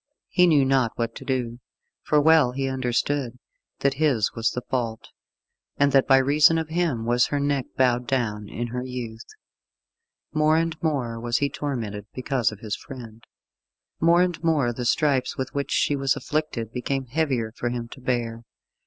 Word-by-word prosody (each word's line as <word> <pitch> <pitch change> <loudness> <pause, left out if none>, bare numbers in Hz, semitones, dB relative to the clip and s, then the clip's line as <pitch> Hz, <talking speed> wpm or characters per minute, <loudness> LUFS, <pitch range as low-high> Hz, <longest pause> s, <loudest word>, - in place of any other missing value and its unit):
He 180 0 +4
knew 145 -5 +4
not 130 -4 +2
what 115 -1 -2
to - - -9
do, 120 -3 -2 0.4
for 150 - +2
well 155 -4 +5
he 135 +1 -2
understood 130 0 -1 0.4
that 140 0 +2
his 130 -9 +2
was 115 0 +1
the 125 - -5
fault, 115 -3 -3 0.7
and 140 0 +3
that 135 -1 +4
by 135 - +6
reason 145 +4 +5
of 160 -1 -2
him 160 -9 0
was 120 +1 +3
her 145 - -1
neck 140 -2 0
bowed 125 -2 +2
down 105 -6 -1
in 120 +1 -4
her 125 +1 -3
youth. 120 -3 -6 1.1
More 155 +1 +3
and 165 0 0
more 130 -8 -1
was 120 0 0
he 140 -1 0
tormented 110 -9 -4
because 130 -3 0
of 105 - -11
his 110 -2 -3
friend. 115 -4 -11 0.8
More 170 +2 +5
and 175 -2 -2
more 145 -7 +2
the 125 +1 -4
stripes 135 +1 +1
with 130 - -4
which 140 0 -2
she 145 - +2
was 135 -1 +1
afflicted 150 -8 -3
became 135 +2 -2
heavier 130 -4 -1
for 120 +1 -3
him 120 -1 -4
to 130 - -12
bear. 120 -2 -2
130 Hz, 175 wpm, -24 LUFS, 120-145 Hz, 1.1 s, by